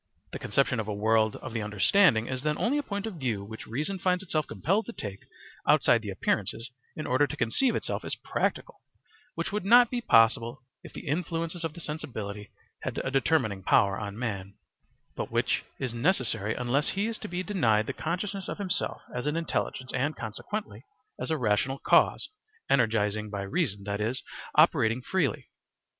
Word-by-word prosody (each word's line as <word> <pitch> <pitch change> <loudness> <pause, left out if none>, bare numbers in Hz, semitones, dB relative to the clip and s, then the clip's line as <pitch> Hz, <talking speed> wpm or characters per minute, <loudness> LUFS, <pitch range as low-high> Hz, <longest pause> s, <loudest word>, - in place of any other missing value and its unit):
The - - -5
conception 135 -3 +1
of 110 - -3
a 105 - -2
world 110 +1 +2
of 130 - -8
the 115 - -1
understanding 110 - +4
is 130 0 -3
then 150 +1 0
only 275 +6 +1
a - - +1
point 200 -6 -4
of 215 -6 -5
view 115 -7 -1
which 110 +2 -9
reason 150 - -2
finds 180 +1 +1
itself 155 -4 -1
compelled 200 +6 0
to 235 - -6
take 100 - -6 0.5
outside 115 - +5
the 105 - -6
appearances 105 +5 -1 0.2
in 155 - -5
order 130 +3 +3
to - - -6
conceive 230 - +2
itself - - -2
as - - -3
practical, - - -2 0.5
which 165 +2 -2
would 210 -1 -2
not 240 +4 +7
be 245 -1 -1
possible 115 - +4 0.2
if - - -10
the - - -9
influences 165 +2 -2
of 165 -2 -2
the - - -8
sensibility 105 -10 -5 0.3
had - - -4
a 135 - -2
determining 130 -8 +2
power 100 +1 +3
on 105 0 -5
man, 100 -5 -4 0.6
but - - -3
which - - +1
is 130 -3 -3
necessary 115 - +1
unless 125 +4 0
he 200 +2 0
is 225 -1 -3
to - - -6
be 180 +1 -3
denied 115 - +2
the - - -3
consciousness 190 +4 -3
of - - -4
himself 195 -3 -1
as 125 +3 -3
an 150 - 0
intelligence 160 -5 -2
and, 145 +4 0
consequently, 165 - -5 0.4
as - - -3
a 160 - +1
rational 120 +3 +1
cause, - - +3 0.4
energizing 110 -4 +2
by 100 -1 -3
reason, 105 - -1
that 100 +1 -3
is, 115 +5 -1 0.3
operating 130 -7 +4
freely. 155 - -1
130 Hz, 180 wpm, -28 LUFS, 110-170 Hz, 0.6 s, not